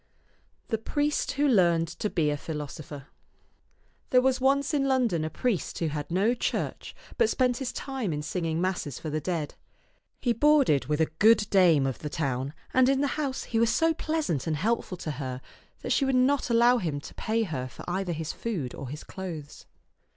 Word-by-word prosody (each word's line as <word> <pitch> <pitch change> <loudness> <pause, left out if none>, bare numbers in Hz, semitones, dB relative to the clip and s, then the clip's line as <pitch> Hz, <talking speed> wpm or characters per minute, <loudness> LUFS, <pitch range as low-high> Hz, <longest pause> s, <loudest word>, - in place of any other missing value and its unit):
THE 225 - 0
PRIEST 295 +5 -1
WHO 290 +2 +2
LEARNED 170 -9 +4
TO 190 +5 -3
BE 155 -6 +1
A - - 0
PHILOSOPHER 150 -2 -7 1.0
THERE 250 - +5
was 260 0 +1
once 280 +3 +2
in 275 -2 +2
London 245 -11 +2
a 155 - -2
priest 215 +1 -2
who 165 - -1
had 145 -1 -4
no 195 +7 +2
church, 245 - -3 0.2
but 460 -2 +4
spent 250 -2 +1
his 260 -2 -3
time 265 -9 -3
in 150 -1 -3
singing 165 0 -2
masses 180 -7 -2
for 155 - -5
the 155 +1 -1
dead. 160 -2 -2 0.7
He 240 - +1
boarded 275 - +4
with 150 +1 0
a - - +5
good 220 -1 +5
dame 170 -8 +5
of 135 -2 -2
the 150 - -5
town, 135 -1 -2 0.2
and 260 0 +5
in 275 0 +2
the 285 - +1
house 280 -4 -2
he 225 - -1
was 230 0 +3
so 325 +4 +3
pleasant 310 - -2
and 155 -2 0
helpful 210 0 -1
to 155 - -4
her 130 -3 -5 0.4
that - - -4
she - - +3
would 265 -1 +1
not 255 +1 +2
allow 240 +1 +5
him 155 -7 -2
to - - -10
pay 225 +1 0
her 135 -10 -3
for 130 - -12
either 180 0 -1
his 160 0 -4
food 175 - -4
or 130 - -7
his 150 +3 -7
clothes. 165 -6 -8
190 Hz, 195 wpm, -27 LUFS, 155-255 Hz, 1.0 s, THERE